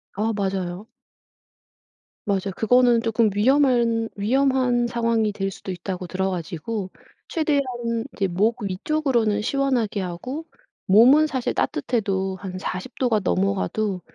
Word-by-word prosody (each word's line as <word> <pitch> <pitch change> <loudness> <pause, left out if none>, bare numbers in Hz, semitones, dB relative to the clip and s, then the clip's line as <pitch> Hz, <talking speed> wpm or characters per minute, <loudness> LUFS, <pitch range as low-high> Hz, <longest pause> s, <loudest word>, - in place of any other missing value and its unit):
아 220 +3 0
맞아요. 190 -1 -3 1.4
맞아요. 195 -1 -1
그거는 245 +1 +4
조금 225 -1 +2
위험한 235 -1 +3
위험한 250 +2 +2
상황이 230 -2 +1
될 195 -1 -2
수도 190 0 -7
있다고 180 0 -5
들어가지고 185 +2 -3 0.4
최대한 305 -4 +1 0.5
이제 200 -4 0
목 210 +6 0
위쪽으로는 220 +1 0
시원하게 250 -4 0
하고 250 - -5 0.4
몸은 255 +10 +6
사실 260 -5 -2
따뜻해도 190 - -1
한 185 -1 -6
40 185 +6 -5
도가 245 -5 +2
넘어가도 195 +1 0
215 Hz, 270 characters per minute, -23 LUFS, 190-245 Hz, 1.4 s, 몸은